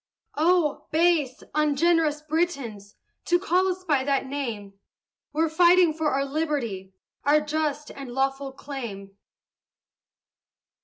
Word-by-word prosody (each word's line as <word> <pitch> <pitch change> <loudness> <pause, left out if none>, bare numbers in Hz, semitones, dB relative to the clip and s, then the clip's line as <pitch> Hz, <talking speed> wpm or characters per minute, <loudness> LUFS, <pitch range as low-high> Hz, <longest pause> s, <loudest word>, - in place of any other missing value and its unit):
Oh, 325 0 +1
base, 315 -5 +2
ungenerous 305 0 +2
Britons! 275 - -2 0.3
To 350 - +3
call 370 0 +1
us 370 0 -3
by 290 -7 +1
that 275 0 0
name; 235 -8 -5 0.6
We're 320 +2 +1
fighting 345 +1 +5
for 315 -1 0
our 275 0 0
liberty, 270 -11 -3 0.3
Our 290 +2 +4
just 300 -1 -2
and 275 -3 -8
lawful 270 +1 -1
claim. 230 -9 -8
295 Hz, 110 wpm, -25 LUFS, 265-325 Hz, 0.6 s, fighting